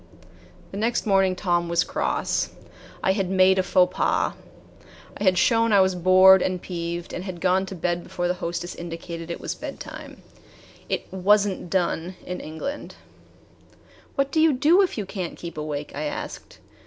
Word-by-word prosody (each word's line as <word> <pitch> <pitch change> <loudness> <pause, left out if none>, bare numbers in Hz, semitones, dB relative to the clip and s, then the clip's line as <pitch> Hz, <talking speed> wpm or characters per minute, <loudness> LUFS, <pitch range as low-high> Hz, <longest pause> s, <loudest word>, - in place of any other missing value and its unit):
The 195 - -6
next 230 +4 0
morning 195 -2 +3
Tom 175 -2 0
was 170 0 +2
cross. - - -1 0.5
I 190 - +3
had 190 -2 -1
made 190 0 +4
a - - +5
faux 180 0 +2
pas. - - +1 0.8
I - - -5
had 185 -2 +4
shown 230 +3 +3
I 200 - +6
was 190 0 +3
bored 185 +1 +6
and 185 0 -1
peeved 170 -1 -5
and 180 - -4
had 185 -3 -6
gone 185 +1 +2
to 190 - -6
bed 175 0 -1
before 175 0 -3
the 180 - +1
hostess 175 +1 -3
indicated 170 0 -7
it 170 - -4
was - - -4
bedtime. - - -9 0.7
It - - -1
"was 200 +2 +4
n't 185 -3 -5
done" 180 0 -1
in 180 0 -5
England. 160 - -6 1.2
"What 275 0 0
do 315 - +2
you 320 -2 +5
do 310 +9 +4
if 375 -8 0
you 210 - -2
can't 185 -3 -5
keep 170 -1 -8
awake?" 150 -1 -4
I 150 +2 -4
asked. 150 - -6
185 Hz, 175 wpm, -24 LUFS, 175-195 Hz, 1.2 s, I